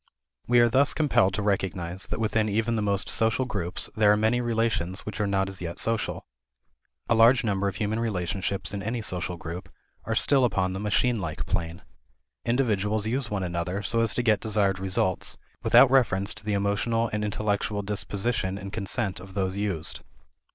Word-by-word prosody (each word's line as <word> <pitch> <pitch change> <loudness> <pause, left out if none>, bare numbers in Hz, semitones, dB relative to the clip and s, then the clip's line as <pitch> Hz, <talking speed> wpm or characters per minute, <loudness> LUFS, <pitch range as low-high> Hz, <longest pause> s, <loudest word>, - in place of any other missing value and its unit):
We 120 0 +5
are 120 - +5
thus 135 +5 +2
compelled 115 -11 +2
to 105 - -2
recognize 95 -2 -2
that - - -4
within 110 -1 +1
even 110 +3 0
the 110 - 0
most 100 -1 0
social 115 +3 +2
group 95 -7 -4 0.2
there 105 -1 +5
are 105 - +4
many 110 +3 +2
relations 115 -6 -1
which 110 0 -5
are 105 - +1
not 95 -1 +1
as 95 -1 -5
yet 85 -1 -5
social. 115 -1 -1 0.8
A - - +3
large 115 +3 +5
number 100 -2 0
of 100 - -3
human 105 +2 -1
relationships 100 -2 -2
in 100 - -3
any 110 +3 -3
social 90 -2 -2
group 85 +2 -7 0.4
are - - -1
still 135 -2 +3
upon 95 -6 +1
the 95 - -4
machine 105 +2 +1
like 80 -4 -4
plane. 85 -1 -3 0.6
Individuals 110 -4 +1
use 120 +2 -1
one 100 -2 -2
another 90 +3 -3
so 115 +3 0
as 115 -2 +1
to 125 - 0
get 110 -3 +3
desired 100 -4 +1
results, 95 -1 0 0.2
without 135 - +6
reference 105 -7 +2
to 110 - -10
the 105 0 -2
emotional 105 +3 0
and 105 0 -1
intellectual 105 0 -1
disposition 100 -1 -2
and 100 0 -8
consent 100 -1 -1
of 95 +1 -12
those 95 -1 -1
used. 100 -6 -1
105 Hz, 185 wpm, -26 LUFS, 95-115 Hz, 0.8 s, without